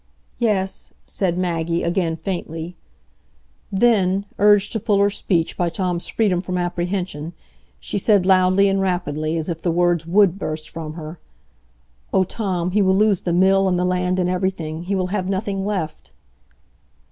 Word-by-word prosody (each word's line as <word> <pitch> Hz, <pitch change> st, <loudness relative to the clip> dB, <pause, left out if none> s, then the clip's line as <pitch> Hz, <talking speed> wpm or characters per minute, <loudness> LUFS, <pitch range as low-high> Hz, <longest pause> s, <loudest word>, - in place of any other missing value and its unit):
"Yes," 200 Hz, -5 st, -1 dB
said 180 Hz, -3 st, -1 dB
Maggie, 170 Hz, -2 st, -1 dB
again 170 Hz, -1 st, 0 dB
faintly. 170 Hz, -1 st, -5 dB, 1.0 s
Then, 195 Hz, -2 st, +2 dB
urged 205 Hz, 0 st, +4 dB
to 220 Hz, -, -2 dB
fuller 205 Hz, -2 st, +2 dB
speech 175 Hz, -4 st, 0 dB
by 175 Hz, -1 st, 0 dB
Tom's 175 Hz, 0 st, -2 dB
freedom 195 Hz, -6 st, +1 dB
from 180 Hz, 0 st, -3 dB
apprehension, 175 Hz, -2 st, -3 dB, 0.5 s
she 205 Hz, -, -3 dB
said 200 Hz, -2 st, +3 dB
loudly 185 Hz, +1 st, +4 dB
and 195 Hz, 0 st, +1 dB
rapidly, 165 Hz, -4 st, -1 dB
as 160 Hz, -, -3 dB
if 165 Hz, -2 st, -4 dB
the 175 Hz, -, 0 dB
words 170 Hz, -1 st, +1 dB
would 195 Hz, +1 st, +3 dB
burst 155 Hz, -3 st, -4 dB
from 160 Hz, -2 st, -7 dB
her: 160 Hz, +1 st, -8 dB, 0.9 s
"Oh, 190 Hz, -, +3 dB
Tom, 185 Hz, -3 st, -2 dB
he 210 Hz, +2 st, +2 dB
will 190 Hz, -1 st, +3 dB
lose 210 Hz, -3 st, +3 dB
the 175 Hz, -, -2 dB
mill 190 Hz, +2 st, +4 dB
and 180 Hz, -, +1 dB
the 180 Hz, -, +1 dB
land 180 Hz, 0 st, 0 dB
and 180 Hz, -1 st, +1 dB
everything; 180 Hz, -3 st, -2 dB
he 195 Hz, +2 st, -1 dB
will 185 Hz, -1 st, 0 dB
have 190 Hz, -3 st, -1 dB
nothing 195 Hz, 0 st, -2 dB
left." 185 Hz, -7 st, -4 dB
185 Hz, 160 wpm, -21 LUFS, 170-195 Hz, 1.0 s, urged